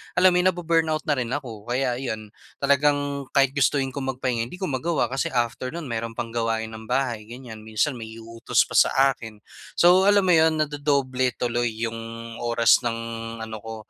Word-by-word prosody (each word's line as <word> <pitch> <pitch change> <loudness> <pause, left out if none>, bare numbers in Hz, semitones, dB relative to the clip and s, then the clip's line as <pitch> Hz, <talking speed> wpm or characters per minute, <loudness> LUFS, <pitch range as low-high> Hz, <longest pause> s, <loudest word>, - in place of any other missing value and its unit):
alam 185 0 +6
mo 180 - +2
yun 180 - +3
nabu-burnout 165 -3 +1
na - - -1
rin 130 -5 0
ako. 115 -5 -5
Kaya 125 0 0
iyon, 110 -5 -5 0.2
talagang 140 0 +1
kahit 135 -1 +4
gustuhin 135 0 +1
ko 140 - -5
magpahinga 130 -3 -2
hindi 125 - -9
ko 185 - -8
magawa 130 -2 0
kasi 135 - -1
after 120 0 -1
nun 160 -7 -6
mayroon 115 0 -3
pang 120 -1 -4
gawain 115 -1 -1
ng 110 0 -10
bahay 120 -4 -1
ganyan. 120 -2 -9
Minsan, 120 +4 0
may 110 - -7
iuutos 115 0 0
pa - - -16 0.2
sa 135 +1 +3
akin. 110 -4 -10 0.3
So, 180 +3 +5
alam 205 -1 +5
mo 185 - +3
yun 160 -1 +5
nadodoble 140 -4 0
tuloy 120 -1 -1
yung 115 0 -3 0.4
oras 115 -1 +4
ng 120 -2 -2 0.5
ano 110 -1 -7
ko 115 +1 -7
130 Hz, 185 wpm, -24 LUFS, 115-145 Hz, 0.5 s, alam